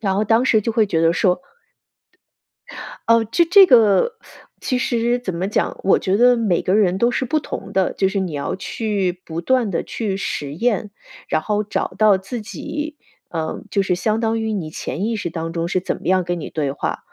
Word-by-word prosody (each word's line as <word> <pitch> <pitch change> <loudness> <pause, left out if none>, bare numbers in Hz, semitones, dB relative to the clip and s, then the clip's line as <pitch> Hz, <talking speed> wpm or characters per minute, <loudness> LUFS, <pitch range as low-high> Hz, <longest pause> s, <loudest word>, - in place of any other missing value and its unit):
然 195 -4 0
后 210 - +1
当 225 +3 +3
时 225 -4 +3
就 230 - -1
会 220 -2 +3
觉 165 -4 0
得 165 0 +4
说 180 +6 +1 1.7
呃， 230 0 +5
这 340 +10 +2
这 380 +3 +7
个 230 - +5 0.5
其 255 - -1
实 240 -1 0
怎 190 -7 -5
么 185 +3 -2
讲， - - -1
我 195 - +4
觉 190 +1 0
得 245 +2 +5
每 210 -7 +1
个 185 - +1
人 190 -3 +3
都 235 +2 +3
是 260 - -1
不 310 +5 0
同 - - -7
的， 190 -1 +1
就 190 - +1
是 195 +1 -1
你 185 -4 -3
要 145 -1 -3
去 190 -2 -2
不 165 0 -5
断 240 +3 +1
地 175 - -1
去 205 -4 -3
实 145 -7 -4
验， 210 +1 0 0.4
然 155 - 0
后 210 0 -1
找 210 - -2
到 215 -2 +5
自 210 +5 -6
己。 295 +7 -6 0.4
呃， 160 -1 -3
就 200 - +1
是 190 -2 +1
相 215 +5 0
当 225 0 0
于 220 - -2
你 180 -7 -3
潜 190 +5 -4
意 230 - -1
识 175 -5 -4
当 165 0 -5
中 165 0 -1
是 185 +1 0
怎 - - -3
么 - - -12
样 185 0 +3
跟 175 0 -3
你 160 - -7
对 145 -3 -1
话， 140 - -3
205 Hz, 230 characters per minute, -20 LUFS, 180-230 Hz, 1.7 s, 这